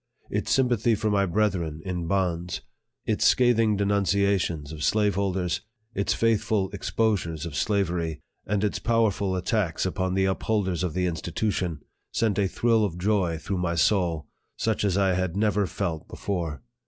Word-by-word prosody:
Its - - -1
sympathy 120 -3 +3
for 105 +1 -1
my 100 -1 +2
brethren 85 -5 0
in 90 -3 -3
bonds 90 -2 -1 0.4
its - - 0
scathing 115 -4 +4
denunciations 100 -6 +1
of 75 -2 -6
slaveholders 95 0 +1 0.3
its 100 -2 0
faithful 110 -3 +1
exposures 85 -8 -1
of 80 -4 -6
slavery 85 -5 0 0.3
and 105 0 0
its 105 - 0
powerful 105 -5 +1
attacks 95 -2 0
upon 95 0 -1
the 95 0 +3
upholders 95 -2 0
of 90 -4 -2
the 90 0 +1
insti 85 -1 -3
tution 90 -5 -1 0.3
sent 105 -3 +1
a 100 - +3
thrill 115 +2 +2
of 90 -5 -2
joy 90 -3 +1
through 95 +3 -3
my 85 -1 0
soul, 85 -1 +2 0.3
such 110 -2 0
as 100 -2 +1
I 95 -2 +3
had 95 0 -1
never 105 -2 +2
felt 85 -2 -3
before 85 -9 -4
95 Hz, 155 wpm, -26 LUFS, 85-105 Hz, 0.4 s, scathing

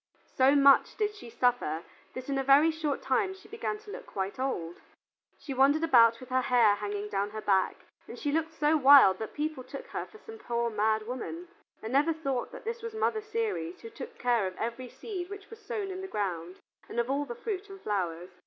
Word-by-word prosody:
So 270 +2 +5
much 280 -1 +5
did 420 -1 0
she 405 - -11
suffer 235 -10 0 0.3
that 255 0 -6
in 275 -1 -1
a - - 0
very 280 +4 +6
short 310 -3 -3
time 390 -4 +1
she 385 - -17
began 450 -1 -3
to 425 -1 -12
look - - -8
quite 195 +4 -4
old. 175 -11 -3 0.6
She 275 - -6
wandered 280 +4 +4
about 230 -7 +6
with 255 - -12
her 260 0 +2
hair 240 -4 +4
hanging 205 0 -4
down 200 0 -1
her 215 +1 -6
back, 195 -3 +2 0.3
and - - -9
she 290 - -2
looked 320 +1 0
so 305 -1 +2
wild 270 -10 +7
that 220 - -6
people 300 -3 -3
took - - -8
her - - -4
for 435 - -15
some 445 0 -12
poor 235 - -1
mad 215 0 +1
woman, 295 +9 -6 0.3
and 225 +3 -5
never 295 +4 +3
thought 275 -6 -3
that - - -11
this 465 +1 -4
was 455 -1 -6
Mother 440 0 0
Ceres 430 - -3
who 455 - -9
took 460 +2 -9
care 240 -5 +1
of 185 - -7
every 235 +2 -4
seed 365 - -6
which 405 +1 -10
was 450 -1 -11
sown 420 -5 -4
in 375 0 -5
the 385 - -5
ground 180 - -3 0.3
and 235 - -3
of 235 - +1
all 285 +1 0
the 240 -3 -6
fruit 410 - -5
and 390 0 -10
flowers. 180 - -3
270 Hz, 220 wpm, -29 LUFS, -, 0.6 s, wild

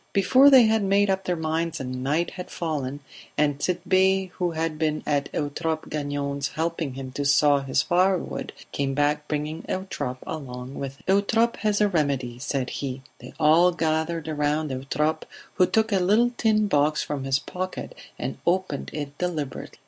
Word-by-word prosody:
Before 260 +8 +6
they 265 -3 +8
had 220 0 +3
made 200 0 +3
up 190 0 -1
their 180 - 0
minds 160 0 -2
night 135 +6 -1
had 180 -1 -8
fallen, 145 -4 -3 0.4
and 145 -2 +2
Tit'Bé, 190 +2 +2
who 180 -1 -1
had 160 -1 -3
been 155 -1 0
at 145 -2 0
Eutrope 155 +2 -2
Gagnon's 140 -1 -2
helping 160 -3 -3
him 135 -1 -6
to 145 - -3
saw 145 0 +4
his 135 0 0
firewood, 185 +1 +1 0.2
came 135 -1 -1
back 150 +1 +1
bringing 150 +2 -3
Eutrope 145 -9 -4
along 130 -4 -6
with 135 -1 -5
him. - - -23
"Eutrope 225 +3 +1
has 210 -1 0
a 210 - +5
remedy," 140 -9 -1
said 135 -1 -2
he. 135 -1 -4 0.2
They 125 - -12
all 165 +3 +5
gathered 160 -1 -1
round 150 0 0
Eutrope, 150 +4 -1 0.3
who 180 - +3
took 220 0 +1
a 195 - +3
little 215 +7 +3
tin 215 -2 +2
box 150 -3 +2
from 145 -2 -4
his 135 0 +2
pocket 185 - -5 0.2
and - - -4
opened 175 -5 0
it 145 -2 -5
deliberately. 160 -7 -4
155 Hz, 165 wpm, -25 LUFS, 140-185 Hz, 0.4 s, they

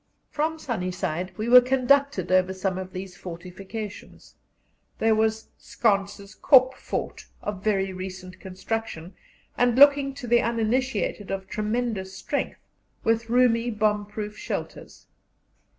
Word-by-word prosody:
From 315 +2 -1
Sunny 225 - -3
Side 180 -1 -3
we 220 - -3
were 250 +1 +9
conducted 260 -6 +2
over 185 0 +3
some 185 0 -2
of 185 0 -7
these 185 -1 -7
fortifications: 190 +5 -9 0.6
there 225 0 +3
was 220 0 0
Schantz's 200 -2 -1
Kop 260 0 +5
Fort, - - -5 0.2
of 205 -2 -5
very 195 -3 0
recent 185 0 -8
construction, 190 -2 -5 0.5
and 245 -1 +3
looking 280 -1 +6
to 275 - -7
the 240 0 +4
uninitiated 230 -1 -1
of 190 -1 -4
tremendous 215 -3 -2
strength, 285 - -3 0.5
with 225 0 +1
roomy 240 -1 +3
bomb 210 -2 0
proof 210 0 -6
shelters. - - -6
215 Hz, 125 wpm, -25 LUFS, 190-240 Hz, 0.6 s, were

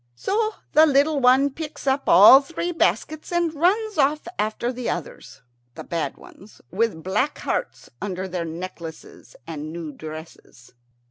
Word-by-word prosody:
So 430 - -1 0.2
the 310 +1 +7
little 285 +1 +3
one 265 +2 +4
picks 305 0 -8
up 270 0 0
all 215 +8 +9
three 335 +4 -4
baskets 310 -1 -1
and 345 -2 0
runs 395 +5 +1
off 295 +2 +1
after 220 +4 -1
the 250 -1 -4
others, 165 -6 -7 0.3
the - - -8
bad 160 -5 -3
ones, 205 +3 -16
with 200 -4 -1
black 210 +10 -1
hearts - - -4
under 190 -1 -4
their 180 -2 -3
necklaces 165 -1 -9
and 155 -1 -6
new 165 -2 -6
dresses. 155 -4 -11
245 Hz, 145 wpm, -23 LUFS, -, 0.3 s, all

